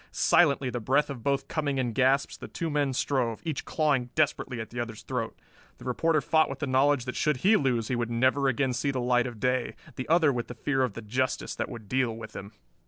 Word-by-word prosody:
Silently, 140 Hz, -6 st, +3 dB
the 120 Hz, -, -3 dB
breath 135 Hz, +6 st, +1 dB
of 130 Hz, -4 st, -7 dB
both 140 Hz, +3 st, 0 dB
coming 145 Hz, -4 st, -1 dB
in 125 Hz, -3 st, -1 dB
gasps, 135 Hz, +3 st, +2 dB
the -, -, -9 dB
two 165 Hz, -2 st, -4 dB
men 145 Hz, -2 st, +1 dB
strove, 125 Hz, -3 st, 0 dB
each 155 Hz, -4 st, -3 dB
clawing 140 Hz, -6 st, +1 dB
desperately 140 Hz, -5 st, 0 dB
at 110 Hz, -, -6 dB
the 120 Hz, -, -5 dB
other's 115 Hz, -2 st, -5 dB
throat. 125 Hz, -3 st, -3 dB, 0.4 s
The -, -, -13 dB
reporter 155 Hz, +5 st, +1 dB
fought 160 Hz, +2 st, +3 dB
with -, -, -5 dB
the 145 Hz, -, -2 dB
knowledge 135 Hz, 0 st, +2 dB
that 125 Hz, -, -4 dB
should 150 Hz, -3 st, +1 dB
he 215 Hz, +3 st, +6 dB
lose 125 Hz, -, +1 dB
he 130 Hz, -, -1 dB
would 120 Hz, -1 st, -1 dB
never 130 Hz, +4 st, +2 dB
again 130 Hz, 0 st, +1 dB
see 140 Hz, -, -1 dB
the 135 Hz, -2 st, -1 dB
light 125 Hz, 0 st, +2 dB
of 120 Hz, -3 st, -8 dB
day, 125 Hz, 0 st, 0 dB, 0.2 s
the 130 Hz, -, -5 dB
other 160 Hz, -3 st, +4 dB
with 120 Hz, -1 st, -3 dB
the 125 Hz, -, -8 dB
fear 135 Hz, +1 st, 0 dB
of 125 Hz, -5 st, 0 dB
the 115 Hz, -, -8 dB
justice 130 Hz, +5 st, -1 dB
that -, -, -3 dB
would 110 Hz, -3 st, -9 dB
deal 125 Hz, 0 st, 0 dB
with 110 Hz, -1 st, -9 dB
him. 100 Hz, +1 st, -7 dB
130 Hz, 240 wpm, -28 LUFS, 120-140 Hz, 0.4 s, he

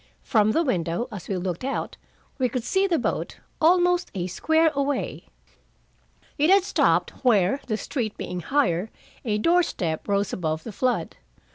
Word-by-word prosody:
From 215 Hz, -3 st, +3 dB
the 330 Hz, -, +2 dB
window, 175 Hz, -, -1 dB
as 200 Hz, -5 st, -8 dB
we 195 Hz, -, -2 dB
looked 180 Hz, +2 st, -3 dB
out, 270 Hz, +1 st, -3 dB, 0.4 s
we 255 Hz, -1 st, +2 dB
could 250 Hz, 0 st, -3 dB
see 380 Hz, +10 st, +1 dB
the 345 Hz, -4 st, +1 dB
boat, -, -, -2 dB, 0.2 s
almost 355 Hz, +2 st, +3 dB
a 180 Hz, -2 st, -2 dB
square 320 Hz, -, +2 dB
away. 280 Hz, -1 st, -2 dB, 1.1 s
It 305 Hz, +3 st, +4 dB
had 390 Hz, 0 st, +6 dB
stopped 400 Hz, -, +2 dB
where, 225 Hz, +1 st, +3 dB
the 215 Hz, -3 st, -1 dB
street 225 Hz, -4 st, -3 dB
being 180 Hz, -, -4 dB
higher, 185 Hz, -, 0 dB, 0.3 s
a 215 Hz, -4 st, 0 dB
door 340 Hz, +11 st, +4 dB
step 165 Hz, -, -3 dB
rose 200 Hz, 0 st, 0 dB
above 160 Hz, -2 st, -2 dB
the 225 Hz, -, -7 dB
flood. 230 Hz, -5 st, -1 dB
235 Hz, 160 wpm, -25 LUFS, 185-310 Hz, 1.1 s, had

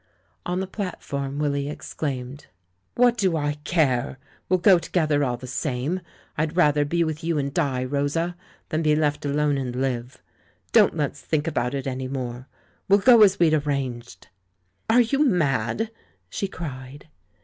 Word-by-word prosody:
On 180 Hz, +1 st, -1 dB
the -, -, -2 dB
platform 145 Hz, -8 st, -5 dB
Willy 140 Hz, -1 st, -1 dB
exclaimed: 140 Hz, -2 st, -5 dB, 0.5 s
"What 245 Hz, -1 st, +4 dB
do 185 Hz, -5 st, +1 dB
I 145 Hz, 0 st, -2 dB
care 140 Hz, -7 st, +1 dB, 0.2 s
— -, -, -33 dB
we'll 185 Hz, -, +4 dB
go 185 Hz, 0 st, +5 dB
together 155 Hz, -4 st, +1 dB
all 125 Hz, -3 st, -1 dB
the 130 Hz, -, -9 dB
same! 135 Hz, +6 st, -2 dB, 0.4 s
I'd 155 Hz, +2 st, -1 dB
rather 150 Hz, -4 st, +4 dB
be 170 Hz, +3 st, +1 dB
with 160 Hz, -1 st, -4 dB
you 165 Hz, -1 st, 0 dB
and 140 Hz, -1 st, -2 dB
die, 130 Hz, -3 st, 0 dB
Rosa, 145 Hz, +6 st, -1 dB, 0.3 s
than 155 Hz, -1 st, 0 dB
be 155 Hz, -1 st, +3 dB
left 150 Hz, -1 st, 0 dB
alone 145 Hz, 0 st, +1 dB
and 125 Hz, -2 st, -4 dB
live. 125 Hz, -1 st, -3 dB, 0.5 s
Don't -, -, +5 dB
let's -, -, -2 dB
think 150 Hz, -1 st, -1 dB
about 140 Hz, -5 st, -1 dB
it 135 Hz, -, -4 dB
any 130 Hz, -1 st, -3 dB
more; 125 Hz, -1 st, -5 dB, 0.4 s
we'll 200 Hz, -, +7 dB
go 235 Hz, +2 st, +6 dB
as 200 Hz, -2 st, +6 dB
we'd 165 Hz, -2 st, +4 dB
arranged!" 130 Hz, -, -3 dB, 0.6 s
"Are 240 Hz, +2 st, +6 dB
you 275 Hz, +5 st, +2 dB
mad?" 170 Hz, -, +1 dB, 0.4 s
she 200 Hz, -, -2 dB
cried. 140 Hz, -5 st, -8 dB
145 Hz, 160 wpm, -24 LUFS, 135-170 Hz, 0.6 s, we'll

